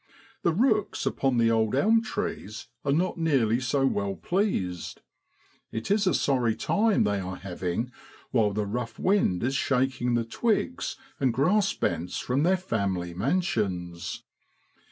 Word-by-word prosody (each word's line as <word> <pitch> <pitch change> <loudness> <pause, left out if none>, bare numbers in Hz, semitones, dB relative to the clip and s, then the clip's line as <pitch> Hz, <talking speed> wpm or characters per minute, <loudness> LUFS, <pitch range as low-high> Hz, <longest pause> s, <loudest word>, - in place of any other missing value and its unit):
The 170 - +2
rooks 215 +2 +1
upon 135 -3 +1
the 115 -1 +4
old 110 0 +2
elm 220 +11 +4
trees 115 - -4 0.2
are 140 - +1
not 175 +4 +1
nearly 130 -8 +2
so 135 +2 +1
well 100 -6 0
pleased. 95 - -1 0.7
It 110 +10 -4
is 205 -1 +3
a - - +3
sorry 125 -5 +2
time 215 0 +2
they 100 -1 +1
are 95 0 -4
having 95 +5 -3 0.4
while 115 -5 +3
the 105 +1 -1
rough 115 +3 -4
wind 185 - +2
is 130 +3 0
shaking 130 -2 +1
the 115 -1 0
twigs 235 - -1 0.2
and 130 -3 +2
grass 180 - +2
bents 85 +1 -2
from 130 +3 0
their 185 +4 +3
family 95 - -2
mansions. 95 - -1
125 Hz, 145 wpm, -27 LUFS, -, 0.7 s, the